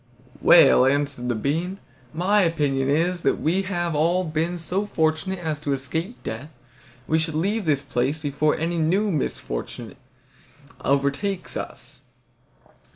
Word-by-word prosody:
"Well," 135 -6 +7
answered 140 -3 0
the 120 - +1
bean, 165 - -2 0.3
"my 195 +5 +2
opinion 145 -6 +1
is 170 +4 +1
that, - - +3
as - - -11
we 175 +5 +1
have 175 -4 -2
all 170 +5 +2
been 165 +2 -1
so 180 +5 -2
fortunate 160 +1 0
as 160 -4 -3
to 145 -2 -1
escape 160 - -4
death, 125 +7 -5 0.6
we 160 - +2
should 160 -1 -2
leave 200 +6 0
this 145 -3 +1
place 130 +5 -1
before 150 0 0
any 165 +1 -1
new 190 +6 +2
misfortune 130 - -4 0.9
overtakes 140 +8 0
us. - - -7
160 Hz, 140 wpm, -24 LUFS, 145-180 Hz, 0.9 s, Well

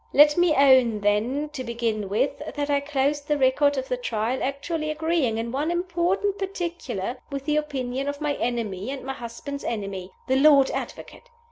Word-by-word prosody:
Let 295 0 +7
me 350 -3 +3
own, 260 -6 +5
then, 230 +9 +1
to 285 -4 -6
begin 230 -4 -2
with, 260 +7 0 0.2
that 290 0 -1
I 285 - +3
closed 285 0 -1
the 295 - +1
record 285 +2 +3
of 265 0 -2
the 250 - -1
Trial 240 +1 -2
actually 305 +4 -2
agreeing 305 -6 0
in 230 +1 -3
one 290 +5 -1
important 360 +3 0
particular 340 - -4
with 275 -1 -4
the 300 0 +1
opinion 270 -3 -2
of 285 0 -3
my 295 -1 0
enemy 225 -4 -2
and 275 -1 -5
my 270 +1 -4
husband's 265 +3 -7
enemy 195 -4 -4 0.2
the 260 0 +3
Lord 280 -1 +6
Advocate! - - -7
275 Hz, 175 wpm, -25 LUFS, 235-300 Hz, 0.2 s, Let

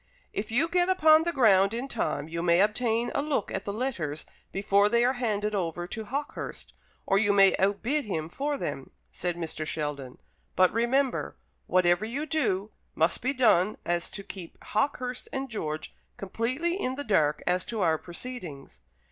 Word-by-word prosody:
"If 205 - -3
you 260 +9 +2
get 355 +1 +2
upon 320 -3 +5
the 340 - +1
ground 205 - +4
in 250 +3 -3
time, 155 - -2
you 165 +1 -4
may 170 0 +3
obtain 225 +3 +1
a - - +1
look 285 -8 -1
at 195 - -3
the 200 - -2
letters 200 - -3 0.3
before 200 +1 +3
they 235 +2 +3
are 255 - +3
handed 215 -4 -1
over 175 -3 -2
to 220 +4 -6
Hawkehurst, 280 +6 -5 0.3
or 195 - +3
you 205 -1 +3
may 195 -1 +6
outbid 230 +9 +1
him 160 -6 -3
for 285 - -2
them," 135 - -5 0.2
said 175 -1 -2
Mr. 160 -2 -4
Sheldon; 145 -4 -4 0.4
"but 185 -1 +4
remember, 245 +4 +1 0.3
whatever 175 +1 +3
you 255 +8 -3
do 215 -11 0 0.2
must 160 +1 +2
be 260 - +1
so - - -18
done 215 -5 +4
as 175 0 0
to 200 - -7
keep 185 -4 -9
Hawkehurst 250 +2 -2
and 270 -1 -4
George 155 -8 -4 0.2
completely 260 - -2
in 255 +1 -1
the 285 - -3
dark 155 - +2
as 180 +1 +1
to 225 -3 -3
our 160 -3 +2
proceedings. 170 - -7
210 Hz, 175 wpm, -28 LUFS, 175-255 Hz, 0.4 s, may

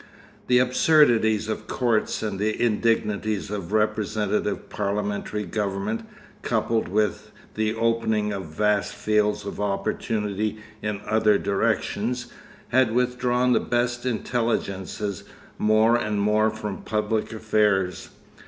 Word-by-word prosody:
The 125 - +5
absurdities 125 -5 +4
of 110 - -4
courts 115 -4 0
and 105 -3 -3
the 110 +1 -1
indignities 105 -2 0
of 100 -4 -5
representative 105 -1 0
parliamentary 105 +1 -2
government, 100 +3 -3 0.3
coupled 115 -1 0
with 105 +2 -1 0.2
the 110 0 -1
opening 110 -2 +1
of 95 -2 -4
vast 105 +6 0
fields 105 0 +1
of 100 - -5
opportunity 105 +1 -1 0.2
in 105 -2 -3
other 110 -1 +3
directions, 115 +5 -1 0.4
had 120 -2 +3
withdrawn 125 0 +2
the - - +4
best 120 0 -1
intelligences 110 -5 -2 0.4
more 110 +2 +4
and 105 -3 -1
more 105 +2 +3
from 105 -2 -5
public 105 0 -1
affairs. 105 -4 +1
110 Hz, 110 wpm, -24 LUFS, 105-115 Hz, 0.4 s, The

